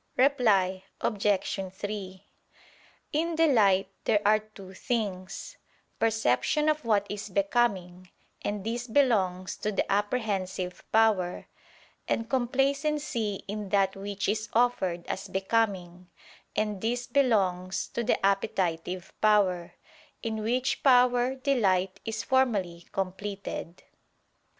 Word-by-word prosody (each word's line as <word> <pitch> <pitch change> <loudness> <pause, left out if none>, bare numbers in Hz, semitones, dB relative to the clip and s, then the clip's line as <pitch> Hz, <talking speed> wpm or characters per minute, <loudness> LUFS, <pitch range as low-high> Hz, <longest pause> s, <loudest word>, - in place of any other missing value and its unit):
Reply 210 -9 +3 0.2
Obj. 195 -2 0
3: 195 -1 -6 0.9
In 330 +2 0
delight 215 -13 +4 0.2
there 210 - +3
are 215 +1 +5
two 210 -3 -13
things: 195 -4 -4 0.4
perception 225 - +2
of 305 -1 0
what 210 -3 +2
is 205 +1 -5
becoming; 190 -3 0 0.3
and 205 -1 -3
this 240 +3 -3
belongs 200 -8 +1
to 210 - -2
the 200 - 0
apprehensive 200 -4 -1
power; 215 -5 +2 0.6
and 230 - -1
complacency 270 -3 0
in 205 0 -5
that 195 -1 +2
which 200 +1 -4
is 215 +1 -1
offered 190 -8 +1
as 190 - -4
becoming: 190 -3 -1 0.5
and 210 -3 -1
this 240 +2 -1
belongs 190 -9 +1
to 235 - -3
the 235 - +2
appetitive 185 -2 -1
power, 185 -5 +2 0.5
in 225 -1 -2
which 250 +4 0
power 250 -1 +4
delight 195 -9 +1
is 220 -1 -3
formally 200 -10 0
completed. 195 -2 -5
205 Hz, 105 wpm, -28 LUFS, 190-240 Hz, 0.9 s, are